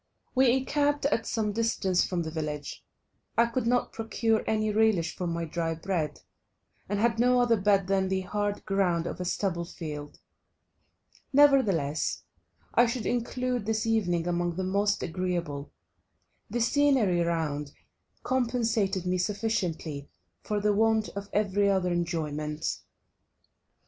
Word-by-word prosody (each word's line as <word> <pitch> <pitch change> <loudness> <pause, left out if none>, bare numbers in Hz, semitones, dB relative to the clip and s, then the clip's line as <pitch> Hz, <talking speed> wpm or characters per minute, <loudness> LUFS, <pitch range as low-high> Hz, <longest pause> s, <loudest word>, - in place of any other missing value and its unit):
We 260 -2 +5
encamped 285 +2 +1
at 230 -5 +1
some 215 -2 0
distance 205 -4 +1
from 175 -2 -1
the 160 - -5
village; 150 -2 -5 0.5
I 235 - +6
could 235 0 -2
not 245 +1 +1
procure 225 0 0
any 215 -1 +1
relish 210 -6 +2
for 180 - -3
my 170 0 -2
dry 165 0 -2
bread, 160 -3 -2 0.7
and 205 - 0
had 230 +1 +2
no 250 +1 +4
other 240 -1 +4
bed 200 -2 +2
than 190 0 +1
the 190 0 0
hard 205 +2 -2
ground 180 -4 +1
of 180 - -5
a - - -3
stubble 180 -1 -1
field. 150 -4 -7 1.1
Nevertheless 235 - +3 0.5
I 240 - +5
should 235 -1 -3
include 245 -1 -1
this 220 +1 0
evening 180 -7 +1
among 175 -1 -1
the 190 - -2
most 200 +2 +1
agreeable; 170 -5 -3 0.8
the 240 +3 -1
scenery 245 -8 +3
round 155 -4 -1 0.5
compensated 225 -7 0
me 180 0 0
sufficiently 180 -8 -2 0.3
for 210 -1 -2
the 210 0 +2
want 220 +1 +2
of 200 0 -7
every 200 -1 +2
other 185 -2 +1
enjoyment. 155 -3 -2
200 Hz, 135 wpm, -28 LUFS, 170-225 Hz, 1.1 s, I